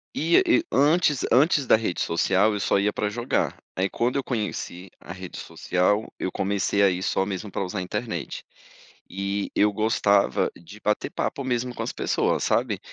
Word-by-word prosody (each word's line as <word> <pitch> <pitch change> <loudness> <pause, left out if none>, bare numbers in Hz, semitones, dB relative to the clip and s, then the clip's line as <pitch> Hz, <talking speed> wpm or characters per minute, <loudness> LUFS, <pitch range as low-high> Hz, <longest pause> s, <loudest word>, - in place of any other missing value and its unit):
E 165 +3 +3
e 335 -1 +3
antes 150 -1 +3
antes 140 +1 +4
da - - +7
rede 110 -5 -2
social, 95 +5 +2
eu 105 - -2
só 100 - +2
ia 105 +1 +1
para 105 0 -2
jogar, 120 +4 -1 0.2
aí 95 +1 +1
quando 120 +5 -1
eu 140 - 0
conheci 105 -6 -4
a 90 - -9
rede 95 -1 -9
social, 100 +4 0
eu 95 - -3
comecei 100 +1 0
a 100 - +6
ir 90 0 -2
só 95 - +1
mesmo 100 0 -5
para - - -2
usar 95 +2 -5
a - - -1
internet. 90 - -4 0.7
E 100 +1 -3
eu 105 0 +4
gostava 100 - +2
de 95 +5 -13
bater 105 - -1
papo, 140 - -3
mesmo, 125 -1 -1
com - - -3
as - - -3
pessoas, - - 0
sabe. - - +1
105 Hz, 185 wpm, -25 LUFS, 95-120 Hz, 0.7 s, da